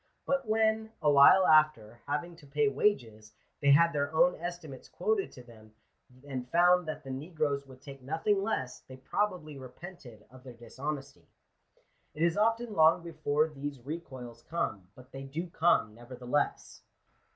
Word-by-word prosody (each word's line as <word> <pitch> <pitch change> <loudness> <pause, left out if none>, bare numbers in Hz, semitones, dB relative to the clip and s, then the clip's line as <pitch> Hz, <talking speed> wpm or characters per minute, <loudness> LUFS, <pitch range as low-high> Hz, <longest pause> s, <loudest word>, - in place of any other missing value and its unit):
But 275 -3 -1
when, 220 0 +1
awhile 150 +5 +6
after, 150 -9 +3
having 170 +4 -3
to 150 -4 -16
pay 145 +1 +1
wages, 115 - -1 0.3
they 140 - +3
had 170 +4 +5
their 145 0 -1
own 175 +2 +5
estimates 175 -5 -8
quoted 435 -3 -1
to 125 - -12
them, 110 -3 -17 0.5
and 130 -3 -5
found 175 +2 +4
that 155 0 -5
the 135 - -7
negroes 145 -1 -3
would 130 0 -15
take 140 -2 -11
nothing 165 +9 0
less, 160 -12 -3
they 130 - -13
probably 155 0 -3
repented 130 - -12
of 130 0 -15
their 130 -2 -10
dis 120 +2 -15
honesty. 140 -1 -5 0.9
It 155 - -1
is 170 -1 +2
often 225 +2 +1
long 160 0 +4
before 155 -2 0
these 145 -2 -6
recoils 130 -7 -8
come; 105 - -4
but 130 +1 -16
they 135 - -8
do 160 +6 -6
come, 165 -11 +2
nevertheless. 125 +4 -3
145 Hz, 155 wpm, -30 LUFS, 130-170 Hz, 0.9 s, awhile